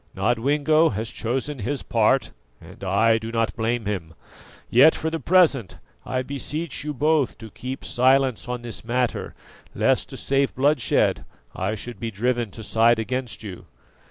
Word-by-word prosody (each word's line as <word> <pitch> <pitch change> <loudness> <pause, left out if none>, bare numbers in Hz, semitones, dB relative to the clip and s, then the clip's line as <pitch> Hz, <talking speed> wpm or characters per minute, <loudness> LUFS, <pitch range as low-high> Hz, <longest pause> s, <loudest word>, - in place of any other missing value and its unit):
Nodwengo 145 - +2
has 110 +3 -4
chosen 125 +6 -3
his 135 +7 -3
part, 115 +3 +2 0.3
and - - -14
I 110 +4 +3
do 110 +1 -6
not 115 -1 0
blame 115 0 -1
him; 85 -5 -4 0.5
yet, 140 +7 +6
for 160 - -3
the 165 - -2
present 155 - +3 0.3
I 130 0 -1
beseech 140 +4 -3
you 150 - -3
both 150 0 +1
to 110 -1 -11
keep 130 +5 -6
silence 130 -1 +2
on 125 -1 -4
this 120 -1 -5
matter, 120 +1 -2 0.4
lest - - +1
to - - -8
save 135 0 0
bloodshed 140 -1 +2 0.3
I 95 +4 -2
should 120 +3 -7
be 115 - -3
driven 120 +2 -1
to 110 +3 -10
side 115 +2 +3
against 125 +1 -3
you." 95 -4 -9
120 Hz, 155 wpm, -23 LUFS, 110-140 Hz, 0.5 s, yet